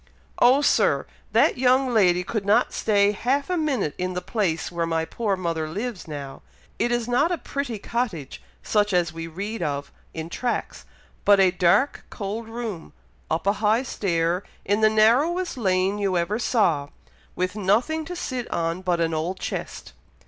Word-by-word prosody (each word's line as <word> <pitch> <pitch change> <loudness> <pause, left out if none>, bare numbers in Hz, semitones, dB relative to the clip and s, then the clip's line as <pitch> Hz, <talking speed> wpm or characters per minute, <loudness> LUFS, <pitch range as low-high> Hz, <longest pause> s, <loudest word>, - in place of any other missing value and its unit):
"Oh, 260 +4 +5
Sir! - - +3 0.3
that - - +3
young 255 0 +3
lady 180 -5 +4
could 215 +3 -3
not 200 +2 +3
stay 205 -2 +3
half 270 - -1
a - - +2
minute 275 - 0
in 180 0 -2
the 180 - -2
place 180 -6 -1
where 170 -1 -1
my 165 -1 0
poor 210 +2 -1
mother 165 -3 -2
lives 210 +3 -5
now. 140 -3 -7 0.4
It 240 - +1
is 240 -1 0
not 270 +8 +2
a 350 - 0
pretty 280 -7 -4
cottage 200 - -3 0.2
such 210 -2 +1
as 175 -3 +1
we 165 0 -6
read 200 +6 -5
of 145 -3 -3 0.2
in 160 0 -4
tracts, 240 +8 -3 0.4
but 205 -1 +6
a 190 -1 +5
dark 180 +9 +2
cold 220 +2 -5
room, 225 -7 -6 0.4
up 165 - -1
a 200 - +3
high 220 +3 +3
stair, 175 -7 0 0.2
in 205 +2 +1
the 215 - +6
narrowest 275 +12 +3
lane 190 -3 +1
you 195 -3 +1
ever 190 +6 -1
saw, 180 - +1 0.5
with 185 +2 -2
nothing 225 +11 +1
to 355 +2 -6
sit 255 -8 -4
on 170 +1 -1
but 180 -2 0
an 165 -1 +1
old 170 +4 -2
chest." 60 - -5
200 Hz, 170 wpm, -24 LUFS, 170-240 Hz, 0.5 s, but